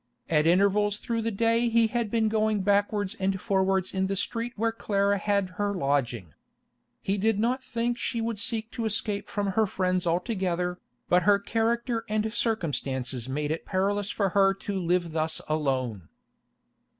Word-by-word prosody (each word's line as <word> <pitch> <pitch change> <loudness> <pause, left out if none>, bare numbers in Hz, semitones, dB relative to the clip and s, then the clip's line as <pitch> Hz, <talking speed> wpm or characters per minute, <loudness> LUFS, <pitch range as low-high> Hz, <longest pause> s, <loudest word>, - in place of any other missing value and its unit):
At 155 0 +3
intervals 200 +3 +3
through 230 +1 -2
the 225 - -1
day 230 +2 +2
he 230 0 +4
had 230 0 -1
been 225 0 +1
going 215 -1 +1
backwards 205 0 +1
and 190 0 0
forwards 190 -2 +1
in 190 0 0
the 195 - -1
street 230 +5 -1
where 225 +2 0
Clara 200 -2 0
had 200 -2 0
her 205 0 0
lodging. 125 - -1 0.7
He 195 +1 0
did 220 +1 +2
not 250 +4 0
think 240 0 -2
she 235 - -1
would 225 -2 -2
seek 220 +2 -1
to 230 - -3
escape 210 -1 -1
from 205 -1 -1
her 215 +2 +2
friends 185 -1 0
altogether, 180 0 -1 0.3
but 180 +1 +4
her 205 +1 +5
character 230 +3 -1
and 215 +1 -1
circumstances 135 - -1
made 145 +2 -2
it 160 - -3
perilous 200 +1 0
for 200 -2 0
her 195 0 +3
to 195 0 -4
live 175 -1 0
thus 160 0 -1
alone. 130 - -1
200 Hz, 165 wpm, -27 LUFS, 180-225 Hz, 0.7 s, her